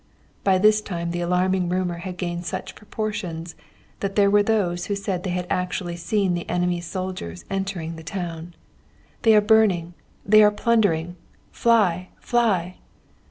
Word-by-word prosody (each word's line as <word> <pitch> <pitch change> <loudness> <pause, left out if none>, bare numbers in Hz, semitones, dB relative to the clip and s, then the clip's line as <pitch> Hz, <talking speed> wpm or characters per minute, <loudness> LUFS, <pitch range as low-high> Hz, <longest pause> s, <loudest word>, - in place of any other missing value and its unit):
By 190 -1 +4
this 215 +2 +4
time 170 -4 -4
the 175 0 -3
alarming 180 +1 +1
rumour 180 -1 -1
had 180 0 -6
gained 175 -1 -3
such - - -5
proportions 205 -6 -5 0.5
that 195 -1 -3
there 200 -1 +4
were 205 0 +5
those 195 -5 0
who 205 - -1
said 195 -3 -3
they 185 - -4
had 180 0 -2
actually 180 -1 -2
seen 190 +2 0
the 175 -1 -4
enemy's 175 -1 -1
soldiers 180 - -5
entering 190 -4 -3
the 160 - -10
town. 170 0 -6 0.7
'They 225 -1 +5
are 210 - +6
burning, 205 -6 +3 0.3
they 215 +1 +7
are 210 - +7
plundering 205 -6 +1 0.3
fly! 190 -6 +2
fly!' 195 -7 0
185 Hz, 155 wpm, -23 LUFS, 175-205 Hz, 0.7 s, they